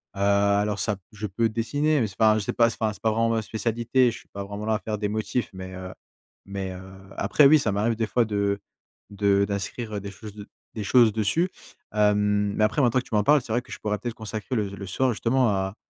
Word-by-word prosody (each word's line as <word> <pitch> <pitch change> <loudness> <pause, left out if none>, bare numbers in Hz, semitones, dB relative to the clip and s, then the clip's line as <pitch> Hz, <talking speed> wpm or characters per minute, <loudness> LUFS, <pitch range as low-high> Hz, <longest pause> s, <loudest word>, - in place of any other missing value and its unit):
Heu, - - -8 0.4
alors 105 0 0
ça 105 -2 0
p 95 - -21
je 105 0 -5
peux 110 +4 0
dessiner, 145 +7 0
mais 110 - +1
c'est 95 - -13
pas 110 -1 +5
un 110 - +1
je - - -3
sais - - -2
pas, 115 -1 +4
c'est - - -7
pas 110 - +1
un - - -4
c'est - - -16
pas 110 - +2
vraiment 115 +1 +1
ma 115 -1 +1
spécialité. 115 +3 +1
Je - - -8
suis - - -20
pas 100 - -7
vraiment 100 +2 -6
là 110 0 +1
à - - -2
faire 105 -1 -4
des 105 0 -1
motifs, 110 +3 -2
mais, 95 0 -8
heu 95 0 -7 0.5
mais, 95 -1 -4
heu, 90 - -8 0.4
après 120 +9 +4
oui, 155 +2 +7
ça 105 - 0
m'arrive 110 +3 0
des 110 -1 -1
fois 120 0 +2
de 100 -1 0 0.5
de 100 0 +2
d'inscrire, 105 +3 -4
heu, - - -2
des 100 0 -7
choses 105 +1 -10
de 105 0 -10 0.3
des 110 - -3
choses 115 0 +5
dessus. 115 - +1 0.4
Hem, 105 -1 +2
mais 110 - +1
après 105 +7 +2
maintenant 125 0 +3
que - - -7
tu - - -13
m'en 105 - +3
parles, 150 +2 +5
c'est 120 - -9
vrai 120 - +1
que - - -17
je - - -7
pourrais 105 -1 -1
peut-être 120 0 -5
consacrer 110 +3 -5
le 105 -4 0
le 100 -1 -8
soir 130 +7 +1
justement 120 +2 +1
à 95 0 -1
105 Hz, 270 wpm, -25 LUFS, 100-115 Hz, 0.5 s, oui